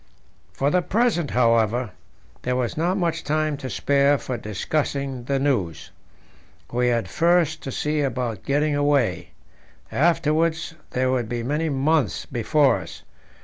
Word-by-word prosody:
For 140 +2 0
the 180 - +3
present, 195 - +1
however, 115 -1 +2 0.5
there 125 0 -1
was 125 -2 -1
not 175 +5 0
much 165 -3 -1
time 155 0 0
to 135 -2 -6
spare 140 +1 +2
for 130 - -4
discussing 130 +4 -3
the 140 +1 0
news. 125 - -1 0.8
We 125 +1 +1
had 120 -2 +1
first 170 -2 +2
to 135 - -5
see 150 +3 -1
about 125 -6 -2
getting 145 +1 +1
away; 145 -4 +1 0.6
afterwards 160 +1 +1 0.2
there 130 0 0
would 120 -4 -1
be 120 -1 -3
many 150 +6 -1
months 140 - +1
before 130 +3 +2
us. - - -10
140 Hz, 140 wpm, -23 LUFS, 125-155 Hz, 0.8 s, the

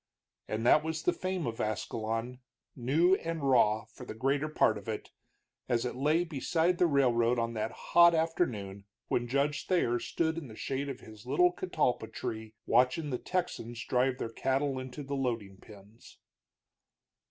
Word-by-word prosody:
And 110 +2 -3
that 150 +5 +6
was 160 0 -3
the 180 - +2
fame 185 -3 -3
of 115 -1 -3
Ascalon, 115 +3 -3 0.4
new 150 +9 +3
and 165 -4 -3
raw, 110 -4 +4
for 110 - -13
the - - -7
greater 140 +5 0
part 110 -8 +2
of 105 - -16
it, 110 - -5 0.6
as 120 -1 +1
it 125 - -2
lay 150 +6 +2
beside 170 +2 0
the 180 - +5
railroad 125 -5 +3
on 115 0 -1
that 110 0 -2
hot 170 0 +5
afternoon 110 - -1 0.2
when 120 0 0
Judge 140 +3 0
Thayer 120 -10 +2
stood 160 +4 -1
in 150 - -9
the 110 - -11
shade 135 +4 -3
of 135 - -6
his 110 +2 -13
little 175 +7 +4
catalpa 155 -12 -1
tree 110 0 -6
watching 125 +5 +2
the 125 - -2
Texans 120 -10 -3
drive 125 0 +1
their 115 - -4
cattle 135 +3 0
into 130 +3 -7
the 140 +1 -5
loading 115 -7 -2
pens. 105 +2 -16
130 Hz, 165 wpm, -31 LUFS, 115-155 Hz, 0.6 s, that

